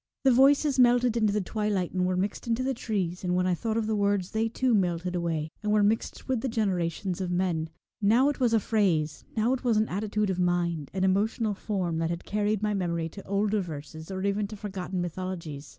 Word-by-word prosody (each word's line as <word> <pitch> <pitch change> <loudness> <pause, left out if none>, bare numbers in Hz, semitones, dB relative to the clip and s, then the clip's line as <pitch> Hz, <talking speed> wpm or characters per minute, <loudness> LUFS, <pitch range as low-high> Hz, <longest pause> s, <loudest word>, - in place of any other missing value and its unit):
The 265 - +5
voices 275 +2 +4
Twilight, - - +6
melted 245 -1 +1
into 215 -3 +3
the 210 +1 0
twilight, 205 -2 -1
and 180 -1 +1
were 185 0 0
mixed 195 +5 -2
into 235 +2 0
the 265 +1 0
trees, 195 -7 -3
and 180 -1 0
when 180 0 +2
I 185 - +2
thought 220 +5 -2
of 225 - 0
the 220 0 0
words 200 -2 +1
they 220 +1 0
too 255 +2 +1
metted 180 -3 0
away, 165 -3 -2
and 210 - -1
were 210 -1 +4
mixed 215 +2 -1
with 260 -4 0
the 265 - -1
generations 190 -4 -1
of 185 - -2
men. 175 -3 0 0.3
Now 230 +7 +4
it 290 - -3
was 245 -3 +3
a - - +4
phrase, 185 -8 0
now 225 +4 +3
it 265 - -3
was 235 -4 +2
an 215 +1 +2
attitude 210 +1 -1
of 185 - -3
mind, 175 -4 0
an 190 - 0
emotional 210 +3 +1
form, 185 -5 -2
that 165 0 0
had 170 0 -4
carried 210 0 0
my 210 0 +1
memory 170 -4 -1
to 200 +5 -11
older 205 +1 +1
verses, 160 -1 -8
or 190 0 -4
even 200 +1 0
to 215 - -8
forgotten 190 -3 -4
mythologies. 170 -5 -5
200 Hz, 230 wpm, -28 LUFS, 175-220 Hz, 0.3 s, Twilight